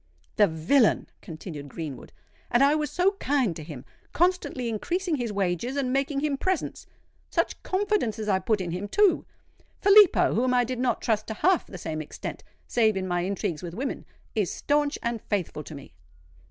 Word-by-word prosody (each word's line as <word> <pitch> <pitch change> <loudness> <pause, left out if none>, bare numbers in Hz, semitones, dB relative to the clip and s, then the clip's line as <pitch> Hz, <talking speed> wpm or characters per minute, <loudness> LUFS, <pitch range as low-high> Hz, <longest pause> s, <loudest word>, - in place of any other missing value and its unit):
"The 210 -2 +6
villain!" 175 - +3 0.2
continued 155 -4 -8
Greenwood. 150 -2 -7 0.4
"And 240 +3 +4
I 280 +1 +5
was 300 -1 0
so 365 +2 +2
kind 255 - +1
to 155 - -7
him—constantly 250 - -2
increasing 340 - -1
his 240 -4 -2
wages 200 +6 -1
and 260 -2 0
making 275 +1 0
him 290 -2 0
presents! 375 -3 -2 0.4
Such - - -1
confidence 385 - 0
as 215 -1 -4
I 190 -2 +3
put 205 +2 0
in 175 -2 -3
him, 180 +4 -4
too! 410 - +3 0.5
Filippo, 405 -2 +6
whom 250 +2 +2
I 245 - +4
did 245 +1 -4
not 245 -3 0
trust 215 -2 0
to 220 - -4
half 365 - +2
the 185 - -9
same 160 -2 -4
extent—save 215 +7 -2
in 185 0 -2
my 175 -1 0
intrigues 180 -4 -2
with 175 -1 -7
women—is 225 -5 -4
stanch 290 0 0
and 235 -2 -2
faithful 180 -7 -3
to 155 - -8
me!" 140 - -12
230 Hz, 170 wpm, -26 LUFS, 180-285 Hz, 0.5 s, The